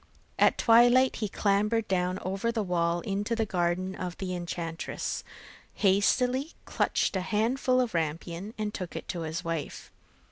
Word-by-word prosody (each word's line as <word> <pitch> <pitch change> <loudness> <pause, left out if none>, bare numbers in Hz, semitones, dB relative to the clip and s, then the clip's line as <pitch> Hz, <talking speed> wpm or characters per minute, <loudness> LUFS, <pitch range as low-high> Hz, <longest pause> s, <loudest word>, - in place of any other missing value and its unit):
At - - +5
twilight, 245 +3 +5
he 215 - -2
clambered 210 +3 +1
down 180 -1 0
over 195 +5 -1
the 225 -2 -1
wall 170 -2 0
into 205 +5 -2
the 225 -1 0
garden 185 0 -1
of 180 -2 -5
the 185 -2 -4
enchantress, 170 -1 -4 0.5
hastily 250 - +2
clutched - - 0
a 190 - 0
handful 245 +6 +1
of 245 -3 0
rampion, 170 +6 -3
and 210 -1 -3
took 180 -3 -6
it - - -6
to 175 - -3
his 160 +2 -4
wife. 165 -3 -4
195 Hz, 150 wpm, -28 LUFS, 175-225 Hz, 0.5 s, At